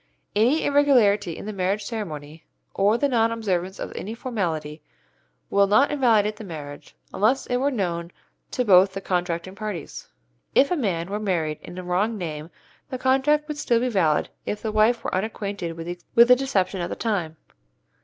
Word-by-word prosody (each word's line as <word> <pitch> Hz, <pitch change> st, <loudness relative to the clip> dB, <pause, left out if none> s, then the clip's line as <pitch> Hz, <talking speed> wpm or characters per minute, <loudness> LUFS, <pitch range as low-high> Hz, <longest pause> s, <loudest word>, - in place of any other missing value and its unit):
Any 245 Hz, +9 st, +3 dB
irregularity 235 Hz, -, +3 dB
in -, -, -8 dB
the 215 Hz, -, -5 dB
marriage 195 Hz, +2 st, -1 dB
ceremony 160 Hz, -9 st, -6 dB, 0.3 s
or 205 Hz, +3 st, +3 dB
the 285 Hz, -, +2 dB
non 230 Hz, -4 st, +2 dB
observance 190 Hz, -5 st, -2 dB
of -, -, -6 dB
any 220 Hz, +4 st, -5 dB
formality 165 Hz, -, -3 dB, 0.7 s
will 200 Hz, 0 st, +4 dB
not 240 Hz, +9 st, +4 dB
invalidate 220 Hz, -7 st, +2 dB
the 220 Hz, -, -8 dB
marriage, 150 Hz, -6 st, -9 dB, 0.2 s
unless 230 Hz, +7 st, +2 dB
it 245 Hz, -, 0 dB
were 270 Hz, +3 st, +1 dB
known 175 Hz, -9 st, -2 dB, 0.4 s
to 250 Hz, -, -1 dB
both 190 Hz, -1 st, +6 dB
the 195 Hz, -, -4 dB
contracting 180 Hz, -1 st, -2 dB
parties. 210 Hz, -4 st, -6 dB, 0.5 s
If 280 Hz, +4 st, +5 dB
a -, -, +3 dB
man 190 Hz, -, -2 dB
were 205 Hz, -, -2 dB
married 165 Hz, -7 st, -1 dB
in 175 Hz, -, -10 dB
a 185 Hz, -, -5 dB
wrong 195 Hz, +6 st, 0 dB
name 155 Hz, -4 st, -5 dB, 0.4 s
the 260 Hz, -, -4 dB
contract 270 Hz, +4 st, +2 dB
would 300 Hz, -1 st, -5 dB
still 240 Hz, -5 st, +2 dB
be 250 Hz, +1 st, 0 dB
valid 170 Hz, -9 st, +1 dB
if 210 Hz, -, -4 dB
the 220 Hz, -, -1 dB
wife 215 Hz, +2 st, +3 dB
were -, -, -3 dB
unacquainted 195 Hz, -4 st, -3 dB
with 165 Hz, -, -6 dB, 0.4 s
the 250 Hz, -, +8 dB
deception 205 Hz, -8 st, -1 dB
at 175 Hz, -, -2 dB
the -, -, -4 dB
time. 180 Hz, -8 st, -2 dB
205 Hz, 175 wpm, -24 LUFS, 175-235 Hz, 0.7 s, the